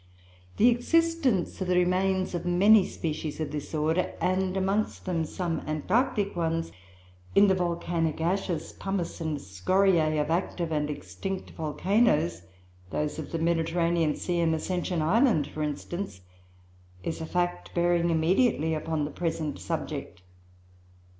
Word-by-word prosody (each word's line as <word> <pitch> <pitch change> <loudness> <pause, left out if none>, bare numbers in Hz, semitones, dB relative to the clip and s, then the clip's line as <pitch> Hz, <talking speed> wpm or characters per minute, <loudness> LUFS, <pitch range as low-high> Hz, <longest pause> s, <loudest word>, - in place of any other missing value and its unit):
"The 235 - +6
existence 270 - +1
of 185 - -1
the 180 - +2
remains 185 +1 +1
of 175 - -2
many 190 +3 +5
species 155 -1 -4
of 155 -2 -3
this 150 +1 -5
order 160 +4 0
(and 185 +1 0
amongst 195 +3 -1
them 170 -3 0
some 170 0 -2
Antarctic 200 - 0
ones) 165 -1 -1 0.6
in 200 - +7
the 195 - +4
volcanic 170 -3 -1
ashes, 175 -1 -1
pumice, 195 -3 -3
and 160 -2 -1
scoriae 155 - +2
of 150 +1 0
active 170 -1 -1
and 150 -1 0
extinct 145 - -5
volcanoes 160 - +1 0.5
(those 150 +8 -2
of 155 - -6
the 165 - -1
Mediterranean 165 -1 +1
Sea 175 -1 -2
and 165 -1 +2
Ascension 175 0 -1
Island, 205 - +3
for 155 - -7
instance) 150 - -4 0.8
is 165 0 -3
a 160 - -4
fact 175 - -1
bearing 175 0 +2
immediately 160 - +2
upon 155 -1 -1
the 150 - -5
present 160 -3 -3
subject. 90 - -5
170 Hz, 135 wpm, -28 LUFS, 155-190 Hz, 0.8 s, in